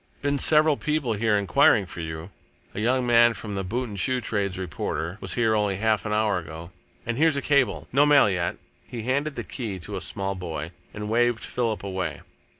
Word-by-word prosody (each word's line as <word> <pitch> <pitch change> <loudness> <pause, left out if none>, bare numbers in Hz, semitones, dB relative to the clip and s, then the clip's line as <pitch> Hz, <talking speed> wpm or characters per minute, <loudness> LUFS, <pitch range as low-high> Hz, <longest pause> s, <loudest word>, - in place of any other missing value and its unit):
"Been 145 0 0
several 155 0 +4
people 150 -6 -1
here 105 0 +2
enquiring 100 +1 +4
for 90 - -9
you. 80 +2 -6 0.4
A - - -5
young 125 +3 +1
man 120 -1 +5
from 105 +1 -6
the 95 -1 -2
'Boot 120 +7 -2
and 100 -3 -6
Shoe 130 +6 +1
Trades 100 -5 -2
Reporter' 85 +1 -4
was - - -3
here 115 -2 +2
only 105 -2 +1
half 110 +1 0
an - - -3
hour 105 -3 +1
ago, 80 +1 -9 0.3
and 120 +2 -2
here's 160 -2 +3
a - - +2
cable. 140 -7 +1
No 145 +3 +5
mail 145 -5 +6
yet." 90 -3 -1 0.3
He 115 -3 -6
handed 140 +4 -1
the - - -4
key 110 -7 -5
to 85 - -7
a - - -4
small 100 0 -3
boy 85 -3 -5 0.2
and 105 0 -6
waved 120 +1 +2
Philip 115 -4 -2
away. 95 -1 -3
110 Hz, 205 wpm, -25 LUFS, 95-125 Hz, 0.4 s, mail